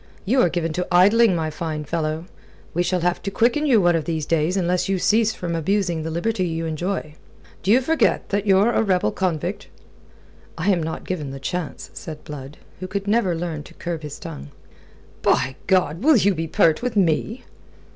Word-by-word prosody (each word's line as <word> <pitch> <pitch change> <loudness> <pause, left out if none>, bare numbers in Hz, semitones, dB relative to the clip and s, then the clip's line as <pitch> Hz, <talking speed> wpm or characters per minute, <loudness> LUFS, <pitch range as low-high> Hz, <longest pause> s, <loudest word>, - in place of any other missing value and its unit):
You 250 +6 +3
are 175 - +4
given 165 -2 -2
to 180 +2 -2
idling, 200 +3 +5
my 160 -2 -1
fine 155 -1 -4
fellow. 155 +1 -2 0.5
We 175 - +1
shall 180 0 0
have 175 +1 0
to - - -3
quicken 240 +9 +2
you 245 -6 +5
one 175 -2 +3
of 160 -3 -1
these 160 -3 -2
days 165 +4 +1
unless 180 0 0
you 195 - +1
cease 220 +4 +3
from 175 -1 -4
abusing 175 0 0
the 160 - -4
liberty 185 +5 -1
you 165 0 -3
enjoy. 160 0 -3 0.5
D'ye 210 +7 +4
forget 320 +5 +1
that 205 +1 -1
ye're 195 +4 +5
a - - +2
rebel 185 - +1
convict?" 175 +1 -2 0.9
"I 205 - +2
am 180 -3 +1
not 160 0 -4
given 155 -7 -3
the 135 0 -7
chance," 180 +2 -5
said 155 -2 -8
Blood, 145 0 -9 0.2
who 185 - -5 0.2
never 205 -3 +2
could 165 - -4
learn 165 -4 -3
to - - -14
curb 170 -2 -4
his 150 -2 -7
tongue. 70 +1 -8 0.7
"By 130 +1 +2
God! 180 -3 +2
Will 300 +1 +5
you 200 -1 +3
be 165 -1 -3
pert 160 +2 +3
with 245 -2 -2
me?" 200 +6 +1
175 Hz, 195 wpm, -22 LUFS, 160-200 Hz, 0.9 s, idling